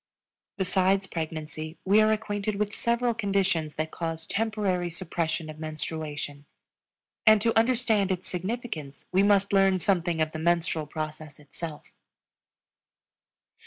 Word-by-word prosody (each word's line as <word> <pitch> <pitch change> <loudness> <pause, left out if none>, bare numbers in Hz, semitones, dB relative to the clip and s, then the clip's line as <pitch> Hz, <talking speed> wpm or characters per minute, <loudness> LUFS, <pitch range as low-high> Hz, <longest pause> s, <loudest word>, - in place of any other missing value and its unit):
Besides 190 0 +2
pregnancy 155 -1 -5
we 205 +3 +6
are 215 0 +4
acquainted 210 -1 -1
with 205 0 -1
several 235 +2 +1
conditions 195 -7 0
that 155 0 -2
cause 165 -1 -4
temporary 200 -5 0
suppression 165 -2 -2
of 155 0 -9
menstruation; 155 -2 -5 0.8
and 215 0 +8
to 230 +2 +1
understand 225 -4 +3
its 185 0 -3
significance 180 - -4
we 185 - +4
must 200 0 +3
learn 195 -1 +5
something 175 -3 +1
of 155 0 +1
the 155 - -5
menstrual 165 -2 +1
process 155 0 -6
itself. 150 +1 -8
180 Hz, 125 wpm, -27 LUFS, 155-205 Hz, 0.8 s, and